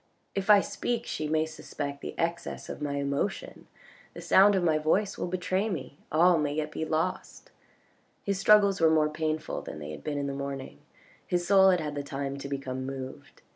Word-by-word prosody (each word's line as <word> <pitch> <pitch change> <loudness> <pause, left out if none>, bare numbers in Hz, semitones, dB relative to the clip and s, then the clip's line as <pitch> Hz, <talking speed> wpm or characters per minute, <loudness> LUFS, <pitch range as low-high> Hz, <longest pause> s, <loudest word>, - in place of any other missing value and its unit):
If 195 +1 -3
I 205 -1 +8
speak 240 +3 -3
she 155 - -3
may 155 +1 +1
suspect 145 -2 -6
the - - -7
excess 170 +1 -3
of - - -7
my 145 -1 -2
emotion, 140 +7 -3 0.5
the - - -7
sound 200 +1 +6
of 185 - +1
my 160 -2 +3
voice 185 +7 +1
will - - -3
betray 185 +3 -1
me. 150 -5 -6
All 170 +2 +5
may 145 -1 -1
yet 150 -1 -2
be 160 - -3
lost. 165 +4 -3 0.7
His 200 -1 -1
struggles 200 -2 +5
were 165 - +6
more 155 -1 +3
painful 155 0 -2
than - - -8
they 75 0 -7
had 75 - -9
been 145 -1 -3
in 140 - -2
the 140 - -3
morning, 135 - -6 0.5
his 175 -1 0
soul 190 0 +6
had 180 -2 +3
had 150 -2 -4
the 145 - -3
time 140 0 -4
to 140 - -6
become 135 -2 -4
moved. 130 0 -8
155 Hz, 200 wpm, -28 LUFS, 140-185 Hz, 0.7 s, I